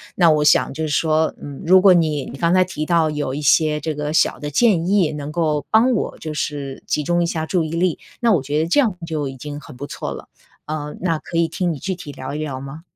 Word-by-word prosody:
那 170 -3 +5
我 150 -1 +2
想 150 - +4
就 160 - -6
是 155 - -3
说， 155 +1 +2
嗯， 140 -2 -8
如 185 +3 +6
果 185 -1 +7
你 155 -5 +1
你 135 - -9
刚 170 0 +2
才 185 - +5
提 155 -4 -5
到 165 -3 +2
有 145 -3 -3
一 145 - -3
些 150 +1 +3
这 155 0 -3
个 150 0 -3
小 - - +2
的 150 - -4
建 175 +1 +2
议， 190 -5 +3
能 150 0 -6
够 155 -3 0
帮 240 +3 +4
我 215 - -2
就 155 -1 -6
是 145 -3 -4
集 150 - 0
中 175 +3 +1
一 170 - +1
下 160 -1 -2
注 175 0 0
意 155 - -4
力， 170 +1 0 0.2
那 235 -2 +3
我 175 - +3
觉 145 +3 -2
得 160 +2 +1
这 180 - +3
样 220 -10 +1
就 155 -4 -3
已 135 0 -7
经 145 +2 -7
很 140 -4 -13
不 140 - -5
错 - - -5
了， - - -8 0.4
呃， 150 -1 -5
那 165 -4 0
可 165 +2 -5
以 170 - +3
听 175 +1 -1
你 150 - -4
具 190 +6 -3
体 170 -5 -8
聊 130 0 -7
一 150 - -4
聊 140 -4 -4
吗？ 140 +4 -9
155 Hz, 285 characters per minute, -20 LUFS, 145-170 Hz, 0.4 s, 果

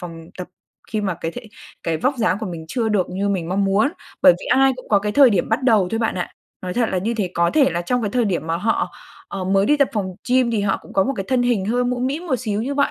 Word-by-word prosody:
phòng 165 -2 -9
tập 180 -1 -6 0.4
khi 215 - 0
mà 195 -3 -1
cái 165 0 -4
thể 245 - -7 0.4
cái 165 -1 -1
vóc 260 - 0
dáng 215 -4 +1
của 220 - -3
mình 170 -3 -6
chưa 235 0 -1
được 200 -4 0
như 195 +2 -1
mình 180 -4 -1
mong 195 +2 +1
muốn. 195 +7 +3 0.3
Bởi 175 - +8
vì - - -8
ai 270 +1 +4
cũng 255 - -12
có 205 - +4
cái 210 +1 -3
thời 275 -1 +7
điểm 195 -5 0
bắt 225 +4 0
đầu 215 -7 +3
thôi 225 - -1
bạn 225 - 0
ạ, 175 - -3 0.3
nói 180 -1 -4
thật 240 -2 +1
là 185 - 0
như 225 +6 -1
thế, 200 -6 -2
có 170 0 +2
thể 290 -4 +3
là 170 +1 -2
trong 245 +7 -1
cái 205 - -1
thời 245 0 +1
điểm 175 -5 -1
mà 165 - 0
họ, 225 +6 -1 0.4
ờ, 195 -2 -4
mới 195 +1 +2
đi 295 - +4
tập 280 -2 +3
phòng 190 -4 -3
gym 250 -1 +3
thì 220 -3 0
họ 195 - 0
cũng - - -14
có 195 - +3
một 275 - 0
cái 195 - -3
thân 255 -2 +2
hình 240 -6 +1
hơi 245 +4 0
mũm 250 0 -1
mĩm 300 +7 -3
một 260 -6 +1
xíu 215 -3 -2
như 280 +3 -3
vậy, 280 - +2
210 Hz, 300 wpm, -21 LUFS, 185-250 Hz, 0.4 s, Bởi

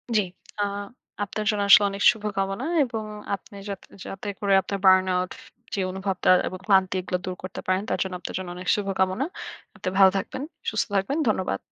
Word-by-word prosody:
জ্বি। 215 - +5 0.4
আ - - +3 0.6
আপনার 215 +1 -4
জন্য 210 -1 +1
আসলে 205 +1 +10
অনেক 200 +1 -4
শুভকামনা। 205 +1 -3 0.2
এবং 225 -4 -4 0.3
আপনি 200 - -16
যাতে 195 -1 -6 0.2
যাতে 195 +2 -7
করে 200 -1 +2
আপনার 195 +1 -4
burn 185 0 +7
out 180 0 0 0.4
যে - - -1
অনুভবটা 190 0 -1 0.2
এবং 185 - -6
ক্লান্তি 190 -2 +4
এগুলো 180 0 -2
দূর 185 0 -3
করতে 185 - -6
পারেন 185 +1 +2
তার - - 0
জন্য 190 -1 -6
আপনার - - -6
জন্য 185 -1 -5
অনেক 180 0 -8
শুভকামনা। 195 +3 0 0.5
আপনি - - -3
ভালো 190 -1 +8
থাকবেন, 260 +7 -4 0.3
সুস্থ 215 - 0
থাকবেন। 195 +10 +1
ধন্যবাদ। 185 - 0
195 Hz, 180 wpm, -25 LUFS, 185-205 Hz, 0.6 s, আসলে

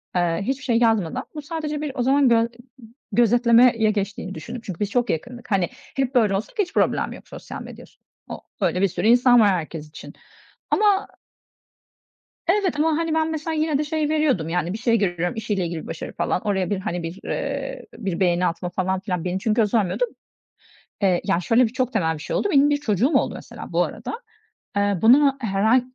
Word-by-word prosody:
eee, 175 -2 +1
hiçbir 270 +6 -2
şey 235 -3 +2
yazmadan 220 -8 +1
bu 300 - -4
sadece 300 -1 -4
bir 300 - -3
o 255 - -1
zaman 270 0 +4
gö 230 -1 +4 0.7
gözetlemeye 235 0 +4
geçtiğini 200 -2 -3
düşündüm. 160 +9 -7
Çünkü 185 -4 -7
biz 205 -1 -1
çok 245 +2 0
yakındık. 240 +10 -5
Hani, 190 -4 +2
hep 270 -1 -4
böyle 215 -6 +3
olsak 225 - -6
hiç 375 -4 -1
problem - - +1
yok - - -12
sosyal - - -8
medyas - - -12 0.4
o - - -7 0.2
öyle 180 - +1
bir 195 - +4
sürü 180 +4 -2
insan 245 +1 +6
var 210 - +5
herkes 160 -4 -3
için. 150 - -11 0.6
Ama 410 -1 +3 1.4
Evet, 370 -4 +1
ama 315 0 +2
hani, 330 -1 -1
ben 320 0 +1
mesela 315 +1 -3
yine 310 -2 +1
de 300 - 0
şey 305 0 -1
veriyordum 285 - +1
yani, 175 +1 -1
bir - - -3
şey 230 0 +2
görüyorum 175 -3 -1
işiyle 210 -4 -2
ilgili; 165 -2 -4
bir - - -11
başarı 160 - -6
falan - - -1
oraya 190 -3 -1
bir 205 -2 -1
hani, 175 -2 -4
bir, 165 +4 -6
ııı, 275 -1 -3 0.2
bir 195 -6 -3
beğeni 180 -1 +2
atma 175 +1 -2
falan 185 +1 -1
filan; 180 -3 -3
beni 180 +1 -1
çünkü 220 +3 +1
o 215 - +3
sormuyordu. 205 0 0 1.0
Eee, 185 -3 +2
yani, 170 - +1
şöyle 235 +6 +4
bir 225 - -1
çok 255 0 -1
temel 160 -7 +1
bir 155 - -8
şey - - -4
oldu. - - +1
Benim 285 -2 +5
bir 290 - +2
çocuğum 230 -2 +1
oldu - - 0
mesela - - -10
bu - - +3
arada. 460 - -6 0.6
Eee, 200 -2 +1
bunu 275 +4 +5
herhâl 220 +3 +3
225 Hz, 200 wpm, -23 LUFS, 185-275 Hz, 1.4 s, insan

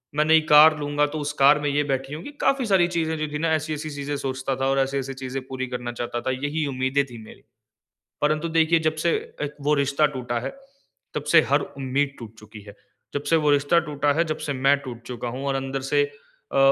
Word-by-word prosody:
मैं 150 +1 +2
नई 160 0 +5
कार 155 +1 +8
लूँगा 145 0 +1
तो 155 +2 -5
उस 145 0 -2
कार 140 +2 +6
में 145 0 -1
ये 145 +1 +1
बैठी 135 -1 -2
होंगी। 165 - -7
काफ़ी 270 -2 +2
सारी 190 -5 +3
चीज़ें 160 -2 -1
जो 155 - -2
थीं 150 - -2
ना 165 +1 0
ऐसी-ऐसी 155 -1 -2
चीज़ें 145 0 -4
सोचता 130 0 -3
था 135 - -2
और 135 0 +2
ऐसी-ऐसी 135 0 -1
चीज़ें 130 0 -5
पूरी 130 -1 -4
करना 125 -1 -4
चाहता 120 0 -3
था 130 - +2
यही 145 +4 -2
उम्मीदें 130 +1 0
थी 120 -3 -11
मेरी। - - -14 0.8
परंतु 155 +2 +1
देखिए 165 +1 +4
जब 155 - -2
से 170 - +4 0.3
एक 150 0 -3
वो 150 +1 +3
रिश्ता 140 +1 +2
टूटा 120 -2 -2
है, - - -4 0.6
तब - - -3
से - - +9
हर - - +4
उम्मीद 135 +1 -2
टूट 115 -2 -10
चुकी 110 0 -12
है। 100 0 -12 0.4
जब 145 - -1
से 165 - +5
वो 150 -2 +2
रिश्ता 145 +4 +3
टूटा 145 -1 +1
है 170 - +4
जब 155 -1 -3
से 145 - -3
मैं 135 +1 +3
टूट 120 -4 -8
चुका 120 -1 -5
हूँ 130 +4 -5
और 140 - 0
अंदर 135 0 -3
से 145 - +4 0.5
अ - - +1
140 Hz, 230 wpm, -24 LUFS, 130-150 Hz, 0.8 s, से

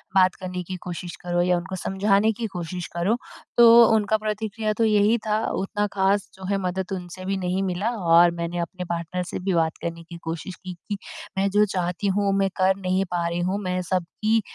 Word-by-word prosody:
बात 185 -1 +5
करने 180 -1 -5
की 185 +2 -6
कोशिश 175 -1 -6
करो 175 0 0
या 180 0 +3
उनको 185 +2 -5
समझाने 200 +3 +2
की 230 - -1
कोशिश 180 -2 -5
करो। 185 +7 +1 0.4
तो 235 0 +9
उनका 220 0 +2
प्रतिक्रिया 215 0 -2
तो 230 - +2
यही 210 +1 +4
था 215 +1 +1 0.2
उतना 205 +1 -1
ख़ास 195 0 +1
जो 190 0 -9
है 200 - +2
मदद 190 +1 -3
उनसे 185 0 -7
भी 195 +1 -1
नहीं 185 +1 -1
मिला 190 +3 -1
और 170 -3 +5
मैंने 170 +1 -2
अपने 180 +1 -4
पार्टनर 170 +1 -2
से - - -4
भी 190 +1 -1
बात 160 -2 +1
करने 170 0 -4
की 170 +1 -10
कोशिश 165 +3 -5
की, 185 +1 -8
कि 200 +4 -6 0.4
मैं 195 +1 +2
जो 205 +2 +4
चाहती 180 0 -2
हूँ 200 -1 +2
मैं 195 0 +2
कर 190 0 +3
नहीं 190 0 0
पा 170 -1 0
रही 170 +1 -2
हूँ, 185 +3 0
मैं 185 0 -1
सब 180 0 0 0.2
की 220 +1 +3
185 Hz, 210 wpm, -24 LUFS, 175-205 Hz, 0.4 s, तो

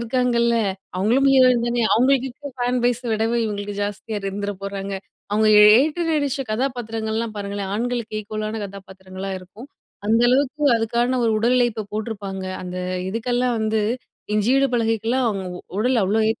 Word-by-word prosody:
இருக்காங்கல்ல. 235 0 +1 0.4
அவுங்களும் 240 +8 +3
ஹீரோயின் 255 -3 +5
தானே! 240 0 0
அவுங்களுக்கு 260 +2 +3
இருக்கிற 285 +2 -9
ஃபேன் 245 0 0
பேஸ 245 -1 +2
விடவே 225 +2 +1
இவுங்களுக்கு 205 -1 -4
ஜாஸ்தியா 205 +1 -4
இருந்துற 200 +1 -3
போறாங்க. 200 0 -4 0.4
அவுங்க 215 +1 +3
ஏ - - +9 0.2
ஏற்று 315 +4 0
நடிச்ச 285 -3 0
கதாபாத்திரங்கள்லாம் 225 -3 -2
பாருங்களேன்! 200 -1 -4
ஆண்களுக்கு 235 -1 -2
ஈக்குவலான 215 +1 -4
கதாபாத்திரங்களா 190 -1 -9
இருக்கும். 205 +9 -13 0.4
அந்த 225 +2 +3
அளவுக்கு 280 +3 +1
அதுக்கான 235 +3 0
ஒரு 225 - +3
உடல் 240 +3 +2
உழைப்ப 230 -4 0
போட்டிருப்பாங்க. 205 -3 -4 0.2
அந்த 180 0 -6 0.3
இதுக்கெல்லாம் 245 +3 0
வந்து 220 0 +1 0.5
இஞ்சி 210 +2 +2
இடுப்பழகிக்கிலாம் 235 -1 +1
அவுங்க 195 -3 -3
உ - - -8 0.2
உடல 245 +1 +2
அவ்ளோ 215 +3 +1
ஏத்தி 225 - -1
225 Hz, 145 wpm, -22 LUFS, 205-245 Hz, 0.5 s, ஏ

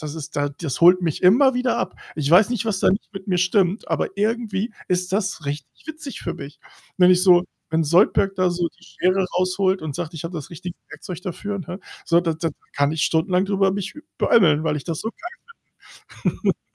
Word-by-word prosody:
das 150 0 -6
ist 155 -3 -8
da 145 0 +1
das 140 -1 -5
holt 180 +2 +7
mich 165 -4 -2
immer 250 +9 +5
wieder 250 0 0
ab. - - -3 0.2
Ich 145 -2 -1
weiß 190 +7 +6
nicht, 240 -4 -1
was 205 -4 -1
da - - +4
nicht 200 +2 -3
mit 195 0 -9
mir 180 - +1
stimmt, 185 +2 +1
aber - - -2
irgendwie 215 0 -1 0.2
ist 180 0 -1
das 195 -5 -1
richtig 140 -1 -7
witzig 310 -3 -7
für - - -4
mich. 140 +2 -10 0.4
Wenn 180 -1 +6
ich 180 0 +4
so 180 -2 +6 0.3
wenn 160 0 +1
Zoidberg 195 +4 +3
da 185 -1 +2
so 175 -1 -1
die 170 +2 -29
Schere 185 +1 0
rausholt 185 0 +1
und 155 -3 -4
sagt: 170 0 -5
„Ich 160 - -6
habe 170 +2 -5
das 150 -4 -6
richtige 180 +1 -8
Werkzeug 180 -2 -8
dafür“, 200 +3 -4
ne? 185 +1 -7 0.2
So, 170 0 +4
da 170 -2 0
da 160 +1 -2
da - - -16 0.2
kann 145 +1 +1
ich 160 -1 -1
stundenlang 180 +3 +2
drüber 195 -1 +1
mich 195 -1 -4 0.2
beömmeln, 155 -9 +4
weil 150 -2 0
ich 140 - -6
das 165 -3 -3
so 225 - -3
geil 350 +8 -9 1.4
finde. - - -51
180 Hz, 220 wpm, -22 LUFS, 160-195 Hz, 1.4 s, holt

